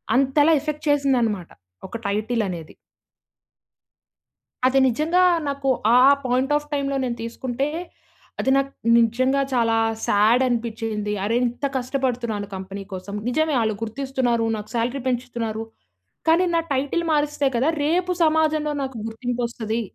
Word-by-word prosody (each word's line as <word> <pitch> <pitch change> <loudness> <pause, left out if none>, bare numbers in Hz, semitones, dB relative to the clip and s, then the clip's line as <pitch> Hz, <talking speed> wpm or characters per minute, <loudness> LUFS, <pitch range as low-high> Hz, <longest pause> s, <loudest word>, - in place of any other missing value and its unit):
అంతలా 275 +4 +4
ఎఫెక్ట్ 305 +1 -5
చేసిందన్నమాట. 245 -10 +1 0.4
ఒక 230 - -6
టైటిల్ 215 +4 0
అనేది. 170 -4 -7 1.9
అది 265 +1 +3
నిజంగా 310 +9 +2 0.3
నాకు 280 -1 -3 0.3
ఆ - - +7 0.3
పాయింట్ 255 +3 +1
ఆఫ్ 295 0 -1
టైమ్‌లో 280 -1 -1
నేను 245 -2 -2
తీసుకుంటే 245 +3 -3 0.7
అది 265 - 0
నాకు 275 0 0 0.3
నిజంగా 255 +4 +2
చాలా 230 -2 +2 0.3
సాడ్ 215 +5 +4
అనిపించింది. 225 -3 -2
అరె! 225 +3 0
ఇంత 245 +4 -3
కష్టపడుతున్నాను 245 -5 -2
కంపెనీ 190 +1 -7
కోసం, 190 +2 -6
నిజమే 310 +3 +1
ఆళ్ళు 220 -1 0
గుర్తిస్తున్నారు, 245 -1 -1
నాకు 210 0 -8
సాలరీ 240 +4 -1
పెంచుతున్నారు. 235 -3 -2 0.7
కానీ, 335 +3 +5
నా 335 - +3
టైటిల్ 285 +6 0
మారిస్తే 295 -1 +1
కదా 255 +6 +2 0.2
రేపు 355 +4 +1
సమాజంలో 310 -1 +2
నాకు 265 -2 -5
గుర్తింపొస్తది. 235 -1 -3
250 Hz, 125 wpm, -23 LUFS, 225-280 Hz, 1.9 s, ఆ